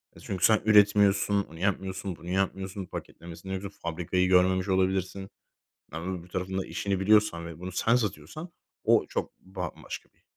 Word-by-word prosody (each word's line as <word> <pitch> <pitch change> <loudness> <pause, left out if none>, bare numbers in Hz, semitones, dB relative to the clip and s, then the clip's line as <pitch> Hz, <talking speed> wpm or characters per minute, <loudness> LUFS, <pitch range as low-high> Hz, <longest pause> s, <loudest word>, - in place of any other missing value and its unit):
E, - - -13
çünkü 95 -3 0
sen 110 -1 +5
üretmiyorsun, 105 -1 +5
onu 80 - -12
yapmıyorsun, 95 0 -2
bunu 85 +1 -10
yapmıyorsun, 95 0 -2
paketlemesini 85 +3 -7
ruf 100 0 -9
fabrikayı 90 +2 0
görmemiş 95 +1 +4
olabilirsin. 95 +1 0 0.6
Yani, 90 +3 -4
öbür 85 - -14
tarafın 95 +1 -3
da 95 - -1
işini 100 -2 -2
biliyorsan 100 -4 +3
ve 85 -1 -9
bunu 90 +1 -6
sen 110 +6 +2
satıyorsan 155 - -3 0.3
o - - +4
çok - - -3
bambaşka 95 -3 -7
bir, - - -36
95 Hz, 155 wpm, -28 LUFS, 90-100 Hz, 0.6 s, sen